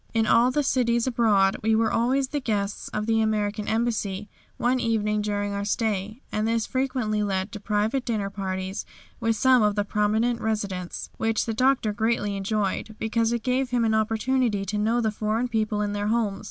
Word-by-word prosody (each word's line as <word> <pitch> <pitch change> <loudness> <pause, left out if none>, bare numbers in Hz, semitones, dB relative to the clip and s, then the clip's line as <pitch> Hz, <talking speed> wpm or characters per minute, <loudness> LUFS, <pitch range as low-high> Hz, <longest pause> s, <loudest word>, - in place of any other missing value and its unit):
In 225 -1 +3
all 230 +3 +5
the 295 +3 +1
cities 235 -3 +1
abroad 215 -6 +3
we 220 +1 +2
were 225 0 +2
always 260 +3 +1
the 290 - -1
guests 205 -5 -2
of 210 0 -3
the 225 0 +2
American 210 -1 -1
Embassy 215 -3 -1 0.3
one 250 +2 +1
evening 210 -3 0
during 205 -1 -2
our 200 0 -2
stay, 215 +2 -2
and 215 +1 0
this 230 -1 +1
frequently 255 -5 -1
led 195 -1 -1
to 210 - -7
private 210 +5 0
dinner 210 -5 -2
parties 190 -1 -4 0.4
with 225 -1 +1
some 255 +3 +4
of 210 -1 +2
the 205 -1 0
prominent 220 +4 +1
residents, 200 -5 -3
which 225 -1 0
the 225 - -2
Doctor 255 -2 +2
greatly 210 -1 0
enjoyed, 205 +1 -2
because 225 +1 0
it 235 -2 -2
gave 255 +1 0
him 240 -2 +1
an 220 - +2
opportunity 220 0 +1
to 210 +1 -2
know 225 +3 +2
the 220 -2 +1
foreign 215 +3 -1
people 215 -2 0
in 205 0 -2
their 205 0 -2
homes. 215 -3 0
220 Hz, 190 wpm, -25 LUFS, 205-235 Hz, 0.4 s, all